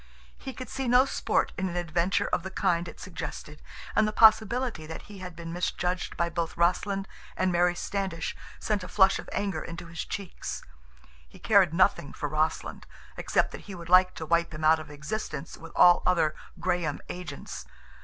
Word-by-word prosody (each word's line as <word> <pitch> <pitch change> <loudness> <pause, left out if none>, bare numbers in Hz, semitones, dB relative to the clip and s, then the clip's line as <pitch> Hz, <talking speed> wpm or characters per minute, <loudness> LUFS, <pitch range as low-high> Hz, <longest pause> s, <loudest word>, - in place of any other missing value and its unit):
He 265 - -7
could 255 -1 -8
see 265 +3 -3
no 250 +2 +6
sport - - 0
in 190 -1 0
an 175 - -6
adventure 175 +2 +1
of - - 0
the 190 - -6
kind 175 -2 0
it - - -10
suggested, 155 -4 -7 0.3
and 215 0 +4
the - - 0
possibility 220 -4 +4
that 160 - -7
he 205 -2 -11
had 180 -2 -8
been 165 0 -7
misjudged 180 +1 -2
by 170 - +1
both 170 -1 -3
Rossland 195 +3 +1 0.3
and 185 0 +2
Mary 175 0 +3
Standish 190 -3 -3 0.2
sent 210 -3 -1
a - - -6
flush 190 0 +4
of - - -8
anger 195 -6 -2
into 170 +1 -7
his 170 +1 -5
cheeks. 200 -3 -6 0.7
He - - -15
cared 200 -6 +4
nothing 165 -4 +2
for 150 - -3
Rossland, 155 +2 -2 0.3
except - - +1
that - - -8
he 195 - -6
would 170 -1 -9
like 185 0 +6
to 160 - -5
wipe 170 +1 +2
him 155 - -6
out 160 +1 +5
of 155 - -9
existence 150 +2 -5
with 165 - -11
all 175 0 +7
other 165 -4 +2 0.3
Graham 175 -4 -1
agents. 180 0 -7
175 Hz, 185 wpm, -28 LUFS, 165-195 Hz, 0.7 s, all